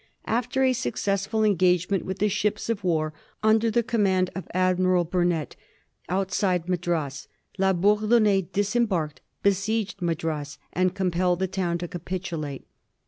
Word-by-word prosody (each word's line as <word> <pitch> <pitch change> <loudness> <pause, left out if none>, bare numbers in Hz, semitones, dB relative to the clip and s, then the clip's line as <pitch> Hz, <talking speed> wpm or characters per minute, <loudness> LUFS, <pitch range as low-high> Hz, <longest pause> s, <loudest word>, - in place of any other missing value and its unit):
After 245 +3 0
a 260 -1 +4
successful 200 - -1
engagement 185 -1 +2
with 190 0 -4
the 210 - +2
ships 210 +2 -1
of 205 -3 -3
war 155 -3 0 0.3
under 220 +1 +4
the 235 +2 +2
command 195 -6 +1
of 190 - -6
Admiral 185 -1 +2
Burnett, 175 -2 0 0.5
outside 185 -1 0
Madras, 165 -6 -2 0.3
La 190 0 +4
Bourdonnais 210 0 +3
disembarked, 200 -7 0 0.2
besieged 200 +1 0
Madras, 160 -4 -2 0.2
and 185 +1 +1
compelled 180 -2 +1
the 190 - 0
town 180 -2 -1
to 175 0 -5
capitulate. 170 -5 -5
185 Hz, 130 wpm, -25 LUFS, 175-205 Hz, 0.5 s, a